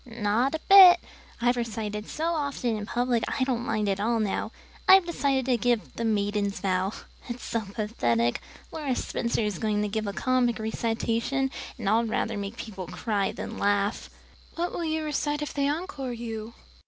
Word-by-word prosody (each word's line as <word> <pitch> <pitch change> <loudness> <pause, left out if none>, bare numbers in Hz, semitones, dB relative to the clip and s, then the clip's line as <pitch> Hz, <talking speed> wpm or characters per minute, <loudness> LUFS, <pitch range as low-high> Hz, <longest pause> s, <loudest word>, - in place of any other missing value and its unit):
"Not 235 +4 0
a - - -3
bit. 375 -3 +10 0.4
I've 245 +1 +2
recited 215 -2 -3
so 330 +2 -1
often 280 -6 -1
in 210 -1 -5
public 240 -1 0
I 260 - 0
don't 250 -2 -1
mind 215 -3 -1
at 195 0 0
all 225 +2 +1
now. 215 +1 -1 0.4
I've 380 -1 +8
decided 280 -6 0
to 255 -2 +2
give 240 -2 0
'The 230 - -3
Maiden's 205 -2 0
Vow.' 190 +1 0 0.4
It's 240 +1 -5
so 230 - -1
pathetic. 120 - 0 0.3
Laura 290 -5 -2
Spencer 235 -1 -1
is 210 -5 -2
going 210 -1 0
to - - 0
give 215 +1 -2
a - - -1
comic 250 +1 +1
recitation, 230 +4 -1 0.3
but 225 -5 -5
I'd 225 +2 +3
rather 225 0 -1
make 200 +2 -5
people 190 -5 -7
cry 205 -4 -1
than - - -6
laugh." 200 +1 0 0.5
"What 345 +1 -1
will 340 - -3
you 315 0 -1
recite 295 0 -1
if 295 - -5
they 280 -1 +1
encore 295 -5 -3
you?" 230 -1 -6
230 Hz, 180 wpm, -27 LUFS, 210-265 Hz, 0.5 s, bit